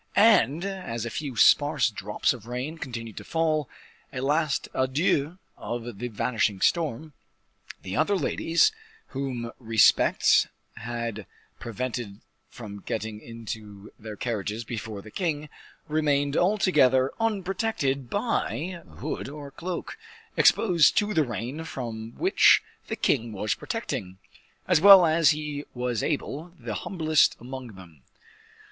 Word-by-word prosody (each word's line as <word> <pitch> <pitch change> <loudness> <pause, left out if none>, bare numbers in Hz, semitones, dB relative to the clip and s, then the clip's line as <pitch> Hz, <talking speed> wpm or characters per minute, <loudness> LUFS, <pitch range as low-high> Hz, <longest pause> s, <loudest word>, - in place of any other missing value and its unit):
And, 175 - +4
as 180 - -4
a 115 - -4
few 140 -5 -5
sparse 140 +2 +4
drops 105 0 -1
of 115 -3 -11
rain 130 +7 -4
continued 115 -5 -6
to - - -6
fall 155 -3 0 0.4
a 130 - -5
last 150 +2 0
adieu 140 +4 +1 0.2
of 120 -3 -6
the 125 - -3
vanishing 110 -3 -1
storm 155 - 0 0.7
the 95 - -5
other 160 +7 +2
ladies, 170 - +2 0.4
whom 130 -4 -4
respect 115 -4 +4 0.3
had 115 -4 -5 0.3
prevented 120 -3 -5 0.3
from 105 -5 -9
getting 110 +1 -4
into 110 -3 -9
their 110 -1 -8
carriages 110 -1 -3
before 110 -3 -6
the 110 - -12
king, 150 - -2 0.4
remained 145 -2 +1
altogether 150 -10 +3
unprotected 195 - -1
by 185 - -2 0.2
hood - - -4
or 145 -1 -9
cloak, 175 - -6 0.4
exposed 175 -8 +4
to 210 0 +2
the 160 - +3
rain 125 +5 -5
from 115 -6 -6
which - - +5 0.2
the - - -3
king 115 -1 0
was 105 +1 -1
protecting, 95 0 -5 0.5
as 180 -4 +4
well 195 -2 +10
as 160 0 +4
he 150 -2 -2
was 125 -3 -1
able, 155 +2 -3
the - - -6
humblest 160 -5 +2
among 125 -1 -8
them. 85 -7 -15
130 Hz, 125 wpm, -26 LUFS, 115-160 Hz, 0.7 s, well